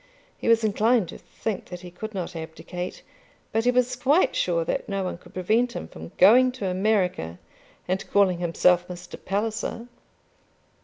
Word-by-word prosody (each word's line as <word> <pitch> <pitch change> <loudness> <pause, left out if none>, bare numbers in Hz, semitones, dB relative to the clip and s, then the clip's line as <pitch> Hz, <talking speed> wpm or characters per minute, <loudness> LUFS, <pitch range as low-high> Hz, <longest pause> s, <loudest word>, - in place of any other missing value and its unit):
He - - -6
was 230 0 +5
inclined 220 -1 +2
to - - -9
think 215 -4 -5
that 180 -1 -8
he 180 -1 -10
could 215 +4 -7
not 180 -2 -4
abdicate, 165 +2 -6 0.5
but 225 +1 0
he - - +5
was 250 0 +2
quite 295 +7 +3
sure 170 -2 +1
that - - -2
no 195 -1 -1
one 180 -2 -4
could - - -18
prevent 225 +7 +1
him - - -5
from 80 0 -10
going 250 +7 +7
to 250 -6 -5
America 185 - 0 0.5
and 185 +1 -2
calling 190 -3 +3
himself 175 +1 +3
Mr. 180 0 -9
Palliser. 215 +3 -2
190 Hz, 165 wpm, -25 LUFS, 180-225 Hz, 0.5 s, going